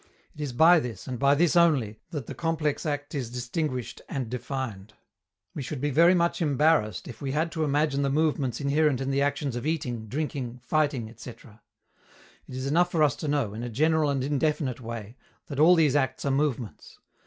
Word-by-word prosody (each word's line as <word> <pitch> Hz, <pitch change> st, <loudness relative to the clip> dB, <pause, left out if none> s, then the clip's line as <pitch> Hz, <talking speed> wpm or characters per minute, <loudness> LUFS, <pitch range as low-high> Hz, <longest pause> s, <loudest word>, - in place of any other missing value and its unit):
It 150 Hz, -, -9 dB
is 145 Hz, -3 st, -3 dB
by 160 Hz, +7 st, +6 dB
this, 120 Hz, -, -6 dB
and 125 Hz, -2 st, -4 dB
by 140 Hz, +1 st, +4 dB
this 170 Hz, +2 st, +2 dB
only, 140 Hz, -11 st, +3 dB
that 150 Hz, -8 st, -5 dB
the -, -, -7 dB
complex 160 Hz, -2 st, -1 dB
act 145 Hz, 0 st, -3 dB
is 130 Hz, -6 st, -3 dB
distinguished 125 Hz, +1 st, -4 dB
and 130 Hz, -5 st, -4 dB
defined. 120 Hz, -5 st, -5 dB, 0.6 s
We -, -, -5 dB
should 135 Hz, +1 st, -5 dB
be 145 Hz, +2 st, -1 dB
very 170 Hz, +6 st, +5 dB
much 170 Hz, 0 st, +1 dB
embarrassed 145 Hz, -, +2 dB
if 120 Hz, -3 st, -10 dB
we 135 Hz, -2 st, -3 dB
had 160 Hz, +2 st, 0 dB
to 160 Hz, -, -2 dB
imagine 145 Hz, -1 st, +1 dB
the 140 Hz, -, +1 dB
movements 145 Hz, -4 st, 0 dB
inherent 145 Hz, -1 st, +2 dB
in 135 Hz, 0 st, -2 dB
the 135 Hz, +1 st, +1 dB
actions 140 Hz, -2 st, -1 dB
of 120 Hz, +4 st, -3 dB
eating, 125 Hz, -8 st, -2 dB
drinking, 130 Hz, -2 st, -4 dB
fighting, 145 Hz, -6 st, 0 dB
etc. 115 Hz, 0 st, -12 dB, 0.9 s
It 125 Hz, -, -9 dB
is 130 Hz, +1 st, -4 dB
enough 170 Hz, +6 st, +2 dB
for 165 Hz, -3 st, +2 dB
us 145 Hz, -4 st, +3 dB
to 155 Hz, -, -4 dB
know, 140 Hz, -8 st, 0 dB
in 110 Hz, -, -6 dB
a 120 Hz, -, -4 dB
general 155 Hz, +5 st, +2 dB
and 135 Hz, -2 st, 0 dB
indefinite 145 Hz, -2 st, -1 dB
way, 115 Hz, 0 st, -7 dB, 0.3 s
that 140 Hz, -2 st, -6 dB
all 170 Hz, +4 st, +7 dB
these 155 Hz, -4 st, +3 dB
acts 135 Hz, -1 st, 0 dB
are 140 Hz, -, +1 dB
movements. 135 Hz, -6 st, -2 dB
140 Hz, 200 wpm, -27 LUFS, 125-155 Hz, 0.9 s, all